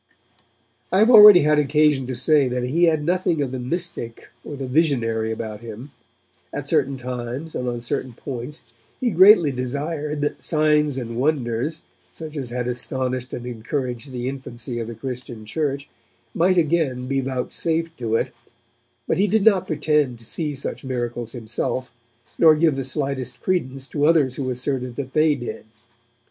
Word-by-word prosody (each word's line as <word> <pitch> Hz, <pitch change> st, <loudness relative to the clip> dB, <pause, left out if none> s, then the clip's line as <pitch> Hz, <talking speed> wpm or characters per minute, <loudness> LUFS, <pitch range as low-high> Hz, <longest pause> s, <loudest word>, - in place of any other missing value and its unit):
I 185 Hz, -, +2 dB
have 220 Hz, +5 st, +5 dB
already 210 Hz, -5 st, +10 dB
had 150 Hz, 0 st, +3 dB
occasion 150 Hz, -2 st, +2 dB
to 130 Hz, -, -3 dB
say 140 Hz, +2 st, +3 dB
that 125 Hz, 0 st, -2 dB
he 160 Hz, +8 st, +2 dB
had 155 Hz, -3 st, +2 dB
nothing 175 Hz, -2 st, +1 dB
of 140 Hz, -3 st, -1 dB
the 130 Hz, -, -4 dB
mystic 125 Hz, -4 st, -4 dB
or 145 Hz, -, -7 dB
the 135 Hz, -1 st, -5 dB
visionary 120 Hz, -7 st, +1 dB
about 110 Hz, -1 st, -5 dB
him. 115 Hz, +4 st, -9 dB, 0.6 s
At -, -, -5 dB
certain 135 Hz, 0 st, +1 dB
times 125 Hz, +4 st, -5 dB
and 125 Hz, -, -3 dB
on 120 Hz, -1 st, -4 dB
certain 120 Hz, +1 st, -3 dB
points, 130 Hz, +3 st, -7 dB, 0.4 s
he 245 Hz, -2 st, 0 dB
greatly 185 Hz, -4 st, +7 dB
desired 145 Hz, +4 st, -3 dB
that 145 Hz, -, -2 dB
signs 150 Hz, -2 st, +2 dB
and 115 Hz, -2 st, -5 dB
wonders, 135 Hz, +2 st, -1 dB, 0.3 s
such 160 Hz, -1 st, -9 dB
as 135 Hz, -5 st, -4 dB
had 125 Hz, 0 st, -3 dB
astonished 125 Hz, +1 st, -2 dB
and 120 Hz, -, -6 dB
encouraged 125 Hz, +2 st, -4 dB
the 125 Hz, -1 st, -4 dB
infancy 130 Hz, -2 st, -5 dB
of 115 Hz, -, -4 dB
the 115 Hz, -, -7 dB
Christian 120 Hz, -2 st, -7 dB
Church, 140 Hz, +3 st, -2 dB, 0.5 s
might 185 Hz, +2 st, +2 dB
again 155 Hz, -6 st, +1 dB
be 135 Hz, +1 st, 0 dB
vouchsafed 160 Hz, +6 st, -2 dB
to 115 Hz, -2 st, -1 dB
it, -, -, -1 dB, 0.7 s
but -, -, 0 dB
he 205 Hz, -, +3 dB
did 210 Hz, +1 st, +2 dB
not 190 Hz, -4 st, +4 dB
pretend 150 Hz, -4 st, +1 dB
to 115 Hz, -, -15 dB
see 150 Hz, +4 st, -4 dB
such 135 Hz, -, -5 dB
miracles 120 Hz, -3 st, -4 dB
himself, 120 Hz, +2 st, -3 dB, 0.5 s
nor 160 Hz, -2 st, +7 dB
give 155 Hz, -2 st, +2 dB
the 135 Hz, -, -2 dB
slightest 135 Hz, -1 st, -2 dB
credence 135 Hz, -8 st, -2 dB
to 145 Hz, -1 st, 0 dB
others 145 Hz, -6 st, +3 dB
who 130 Hz, -2 st, -2 dB
asserted 125 Hz, -1 st, -2 dB
that 130 Hz, -1 st, -6 dB
they 155 Hz, -1 st, +3 dB
did. 120 Hz, -4 st, -7 dB
135 Hz, 165 wpm, -22 LUFS, 125-155 Hz, 0.7 s, already